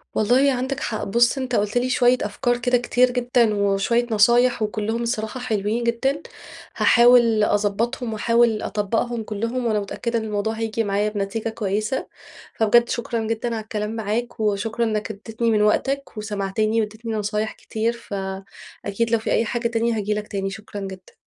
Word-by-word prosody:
والله 250 +6 +4
عندك 260 +2 -2
حق، 220 - -3
بُصّ، 235 +6 +3
أنت 255 -2 -2
قُلت 205 +3 0
لي 250 +1 +1
شوية 250 -1 +4
أفكار 240 +4 0
كده 245 +1 +2
كتير 245 +1 +2
جدًا 245 -2 +2
وشوية 200 +4 +1
نصايح، 240 +3 +4
وكلهم 215 +2 -1
الصراحة 230 +1 -3
حلوين 220 -1 -1
جدًا، 265 +6 0 0.6
هاحاول 235 -3 +5
أضبّطهم 220 +4 0
وأحاول 230 0 +2
أطبّقهم 225 +3 -1
كلهم، 230 +4 -3
وأنا 215 -2 +1
متأكدة 230 +3 -2
إن - - -5
الموضوع 215 0 -2
هييجي 225 0 -2
معايا 205 +1 0
بنتيجة 210 +2 -3
كويسة، 215 +3 -2 0.5
فبجد 235 +2 +4
شكرًا 230 -1 -2
جدًا 225 +2 -2
على 220 - -4
الكلام 215 0 -4
معاك، 225 +3 -3
وشكرًا 215 +2 0
إنك 215 0 -2
ادّتني 225 +3 -2
من 210 -1 +3
وقتك 270 +5 0
وسمعتني 215 +1 -1
وادّيتني 220 +2 -5
نصايح 210 0 -1
كتير، 225 +2 -2
فأكيد 200 +1 -5
لو 230 - +3
في - - -3
أي 230 - +2
حاجة 235 +1 -1
تانية 230 -1 0
هاجي 210 0 -1
لك 210 0 -4
تاني، 195 -1 -3
شكرًا 205 0 -8
جدًا. 190 -1 -9
225 Hz, 160 wpm, -22 LUFS, 210-240 Hz, 0.6 s, هاحاول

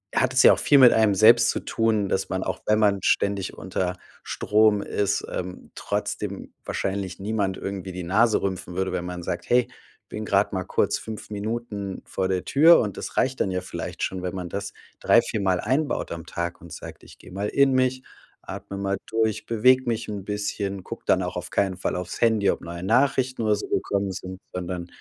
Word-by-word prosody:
hat 130 0 +2
es 130 - +5
ja - - +8
auch - - -1
viel 140 +3 +5
mit 125 -2 +9
einem 110 -2 +4
selbst 115 +3 +6
zu - - -3
tun, 110 -3 0
dass 95 - -1
man, 95 - -2
auch - - -4
wenn 105 0 +3
man 100 -2 +3
ständig 100 -1 +1
unter 90 -1 -3 0.3
Strom 105 -1 +2
ist, 100 0 -1
ähm, 90 0 -6
trotzdem - - -4
wahrscheinlich 95 -1 -3
niemand 100 -2 -1
irgendwie 95 -1 -5
die 90 0 -6
Nase 110 +6 +3
rümpfen 95 -2 -3
würde, 95 0 -1
wenn 85 - -2
man 90 0 -5
sagt: 85 0 -4
„Hey, 125 0 +4 0.4
bin 110 - -5
grad 100 0 +2
mal 95 -1 -1
kurz - - 0
5 110 -1 -8
Minuten 105 -2 -4
vor 95 - -2
der 95 -1 -1
Tür.“ 160 +5 +6
Und 105 -4 -2
das - - -6
reicht 130 0 +1
dann 95 - +1
ja 90 0 -1
vielleicht 95 - -6
schon, 95 -1 -3
wenn 90 - -3
man 90 -2 -5
das 100 +2 -5 0.3
3, - - +5
4 105 - -3
mal 95 -2 +1
einbaut 135 +7 -1
am 85 -1 -6
Tag 85 0 -4
und 85 -2 -11
sagt: - - -10
„Ich - - -16
gehe - - -14
mal 100 +3 -3
in 140 -1 +3
mich, 130 0 +1 0.4
atme 100 - -7
mal 100 0 -1
durch, 110 -1 0
bewege 125 +3 +4
mich 115 -1 -1
'n 100 -2 -5
bisschen, 100 -1 -3
gucke - - -8
dann - - +3
auch - - -4
auf - - -5
keinen 95 -2 +1
Fall 90 - -2
auf‘s 90 0 -6
Handy, 110 -4 +3
ob - - 0
neue 85 0 -7
Nachrichten 130 +4 +2
oder 105 -1 +3
so 105 - -6
gekommen 100 -1 -1
sind, 95 0 -7
sondern 90 -1 -4
100 Hz, 210 wpm, -25 LUFS, 95-110 Hz, 0.4 s, mit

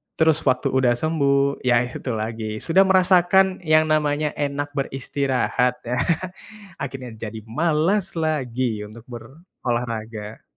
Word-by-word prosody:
terus 160 -1 +3
waktu 130 -1 +2
udah 130 -2 +3
sembuh, 140 -1 +1
ya 120 -1 +4
itu 125 +1 -5
lagi, 110 +1 -4 0.2
sudah 190 +4 +4
merasakan 185 0 +4
yang 155 0 +4
namanya 150 0 +1
enak 145 0 -2
beristirahat 135 -2 0
ya, 125 +1 -1 0.8
akhirnya 130 -2 -5
jadi 110 0 -6
malas 165 - 0
lagi 130 -8 -1
untuk 115 +2 -13
berolahraga. 115 - -5
135 Hz, 115 wpm, -22 LUFS, 120-155 Hz, 0.8 s, ya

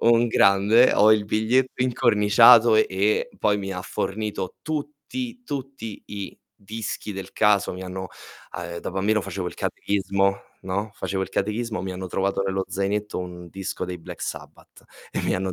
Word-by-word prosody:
Un 120 0 +4
grande, 105 +4 +5
ho 105 +1 +6
il 105 -1 +2
biglietto 125 +5 +1
incorniciato 115 -1 +6
e 105 - +1
poi 105 -1 +2
mi 95 -1 -4
ha 90 - -4
fornito 100 -1 -3
tutti, 155 - -5
tutti 135 - -6
i 100 -2 -7 0.2
dischi 105 0 -6
del 95 0 -7
caso. 105 -2 +3
Mi 95 - -7
hanno 95 0 -6 0.5
uhm, 85 -1 -5
da - - -5
bambino 100 +3 +1
facevo 95 -1 -4
il - - -11
catechismo, 100 0 0 0.3
no, 100 +3 -2
facevo 95 -1 -2
il - - -4
catechismo, 110 +1 -2
mi 95 -1 -4
hanno 95 0 -5
trovato 95 +2 0
nello 95 0 -1
zainetto 100 +1 -2
un 90 -1 -7
disco 95 +1 -5
dei 90 -1 -5
Black 80 - -10
Sabbath - - -8 0.3
e - - -3
mi - - 0
hanno 95 0 -2
100 Hz, 160 wpm, -24 LUFS, 95-115 Hz, 0.5 s, ho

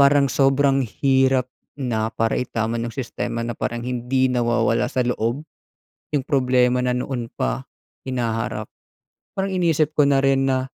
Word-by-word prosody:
Parang 140 -1 +5
sobrang 135 0 +3
hirap 130 +1 +2 0.3
na, 115 -5 -1
para 115 0 0
itama 115 -2 -2
ng 120 - -2
sistema 120 -1 -4
na 120 - -2
parang 120 +1 -4
hindi 125 +1 0
nawawala 120 0 +1
sa 125 0 0
loob 120 +3 -1 0.7
yung 145 - +2
problema 125 -3 +3
na 125 0 +1
noon 125 -1 -3
pa 130 - -2 0.4
hinaharap. 115 -4 -2 0.7
Parang 195 +1 0
iniisip 160 -4 +1
ko 150 - +4
na 140 -1 +3
rin 135 0 +3
na 130 0 0
125 Hz, 145 wpm, -22 LUFS, 120-135 Hz, 0.7 s, Parang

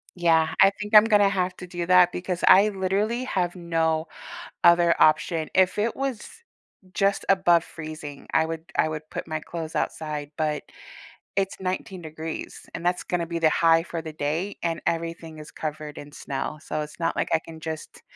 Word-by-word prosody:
Yeah, 160 -2 +3
I 195 - +8
think 210 +1 -6
I'm 210 +1 +10
gonna 205 -2 +5
have 185 -2 -1
to 180 - -9
do 175 -1 -4
that 180 -1 +6
because 180 0 -4
I, 205 +3 +7
literally, 205 +5 -1
have 180 -7 -1
no 165 -2 0 0.6
other 170 0 +6
option, 155 +1 +3
if 185 +1 +3
it 225 +2 0
was 270 -5 -3 0.6
just 195 0 +1
above 175 -3 +4
freezing, 155 -3 -9
I 160 0 +4
would 165 +3 -7
I - - +4
would 155 0 -6
put - - -5
my 155 -1 -3
clothes 160 0 -7
outside, 150 -2 -3
but 150 -1 -1 0.7
it's 195 0 -1
19 185 0 -4
degrees, 160 +1 -7
and 170 +1 -5
that's 180 0 +1
gonna 175 -2 -2
be 170 0 -4
the 160 -1 +4
high 165 0 +4
for 170 -1 -5
the 160 -1 -7
day, 155 +7 -2
and 165 -1 -1
everything 165 -1 -3
is 150 - -10
covered 155 -1 -6
in 145 0 -10
snow, 145 +2 -5
so 155 - -3
it's 150 +3 -10
not 165 0 0
like - - -1
I 160 - +3
can 160 -1 -11
just 160 -1 -7
165 Hz, 185 wpm, -25 LUFS, 155-185 Hz, 0.7 s, I'm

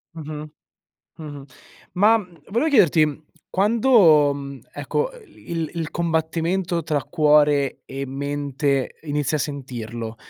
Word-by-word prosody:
Mh-mh. 155 -1 -7 0.7
Mh-mh. 145 -3 -8 0.5
Ma, 210 +5 +5
mhmm, 180 -5 -11
volevo 240 +10 +1
chiederti: 155 - +3 0.3
quando, 195 - +5
mhmm, 140 -1 -7
ecco, 145 - -2 0.2
il 165 - -5
il 165 -2 -3
combattimento 170 +1 -1
tra 150 -2 -1
cuore 150 -3 +3
e 135 +1 -5
mente 140 0 -2
inizi 150 -1 -1
a - - +1
sentirlo, 120 -5 -5
150 Hz, 110 wpm, -22 LUFS, 140-170 Hz, 0.7 s, Ma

